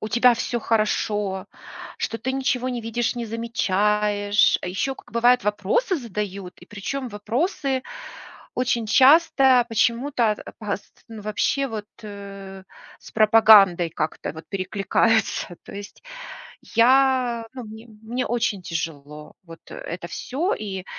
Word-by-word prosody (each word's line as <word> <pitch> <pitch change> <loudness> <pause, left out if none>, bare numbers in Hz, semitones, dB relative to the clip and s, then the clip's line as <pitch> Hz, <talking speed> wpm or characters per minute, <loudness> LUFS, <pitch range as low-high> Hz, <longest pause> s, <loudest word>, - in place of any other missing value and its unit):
у 215 - -4
тебя 240 +2 +4
всё 240 +1 -2
хорошо, 210 -3 -1 0.5
что 225 - -3
ты 260 +3 -3
ничего 260 -1 -1
не 245 -2 -3
видишь, 230 +2 -2
не 235 - -3
замечаешь. 210 -2 +1
А - - -4
еще 230 +9 -2
как, - - -17
бывает, 245 +2 +3
вопросы 210 - 0
задают. 200 - -5
И - - -15
причем 255 +6 -5
вопросы 260 - -2 0.7
очень 245 -2 0
часто 265 0 +5
почему-то, 235 +1 +1
ат 210 - -8
опаст 205 -2 -7
ну, 220 -2 -9
вообще 240 +6 0
вот, 215 -2 -6 0.2
э, 200 -2 -9 0.3
с - - -14
пропагандой 215 -5 +6
как-то 155 0 -4
вот 160 0 -10
перекликаются. 195 0 0
То - - -11
есть 205 0 -10 0.7
я, 250 -1 +3
ну, 250 -2 -7
мне 220 +1 -11 0.2
мне 245 +3 -3
очень 225 -4 -1
тяжело 150 -3 -6
вот 165 -1 -13
это 170 0 -7
всё, 310 - -2
и 195 -3 -6
220 Hz, 130 wpm, -23 LUFS, 200-245 Hz, 0.7 s, пропагандой